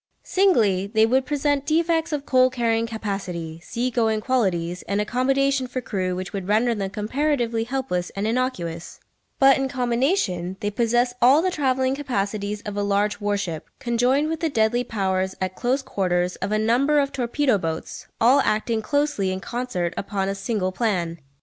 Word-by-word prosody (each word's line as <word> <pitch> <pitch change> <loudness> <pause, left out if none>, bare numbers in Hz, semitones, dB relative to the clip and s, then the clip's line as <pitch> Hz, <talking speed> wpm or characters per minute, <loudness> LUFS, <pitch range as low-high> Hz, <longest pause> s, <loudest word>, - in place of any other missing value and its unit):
Singly, 220 - +2
they 220 +1 +3
would 260 +3 +1
present 290 -1 0
defects 325 0 +1
of 290 -2 -3
coal 255 -1 +4
carrying 230 -2 0
capacity, 195 -7 -5
sea 240 +8 -3
going 225 -2 +1
qualities, 185 -8 0
and 200 +1 0
accommodation 265 +4 +1
for 250 +1 -4
crew 185 -6 -2
which 185 +3 -6
would 195 -2 -4
render 225 +4 +2
them 200 -3 -3
comparatively 230 +2 -1
helpless 245 -9 -2
and 200 +1 -2
innocuous; 215 -9 -2 0.4
but 270 -1 +6
in 270 - 0
combination 240 - 0
they 205 - -2
possess 240 +3 +1
all 270 +7 +6
the 370 - +1
travelling 260 -4 +1
capacities 210 -6 -3
of 205 -1 -5
a 205 - -1
large 205 +1 0
warship, 200 -6 -2
conjoined 250 +5 +1
with 320 0 -2
the 325 -1 0
deadly 240 -1 +1
powers 190 -4 -1
at 185 0 -2
close 260 +2 0
quarters 180 -5 0
of 195 +2 -3
a 215 - +2
number 245 +7 +2
of 280 -1 +2
torpedo 250 -2 +1
boats, 160 -2 -5
all 250 +5 +5
acting 220 -2 0
closely 285 -6 0
in 185 - -3
concert 205 -6 -3
upon 195 -1 -2
a 195 - -1
single 195 -1 -2
plan. 180 -6 -1
225 Hz, 170 wpm, -23 LUFS, 195-260 Hz, 0.4 s, but